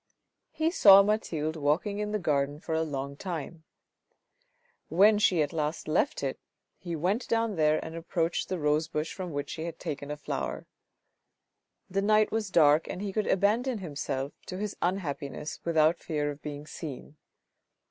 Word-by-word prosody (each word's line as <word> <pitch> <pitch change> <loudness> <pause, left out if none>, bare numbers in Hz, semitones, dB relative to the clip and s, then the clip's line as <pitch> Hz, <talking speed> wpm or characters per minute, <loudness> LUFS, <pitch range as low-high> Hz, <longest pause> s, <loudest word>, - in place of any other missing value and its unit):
He 315 +1 0
saw 200 - +8
Mathilde 165 -7 -1
walking 160 +7 0
in 210 0 -2
the 210 - +1
garden 145 -5 0
for 160 - -4
a 160 - +1
long 140 -3 -3
time. 165 -1 -6 1.2
When 205 +5 +5
she 185 -7 +4
at 145 - -4
last 155 0 -2
left 170 - +1
it, - - -2 0.4
he 175 -3 -4
went 190 - 0
down 225 -2 +1
there 155 -1 +3
and 160 0 -7
approached 165 0 -1
the 185 - -1
rose 150 0 +1
bush 155 0 -3
from 185 -2 -5
which 145 -1 -4
she 160 - -4
had 170 -1 -6
taken 145 -4 -5
a 150 - -4
flower. 65 - -4 1.2
The 195 +1 -1
night 215 +1 +3
was 220 -2 -1
dark 155 -3 +5
and - - -5
he 200 -1 -4
could 215 0 0
abandon 225 +6 +2
himself 145 -6 -4
to 185 - -5
his 210 +1 -3
unhappiness 150 -5 -3
without 160 0 +3
fear 150 -2 -2
of 145 0 -10
being 145 0 -6
seen. 150 -1 -8
165 Hz, 170 wpm, -29 LUFS, 150-195 Hz, 1.2 s, saw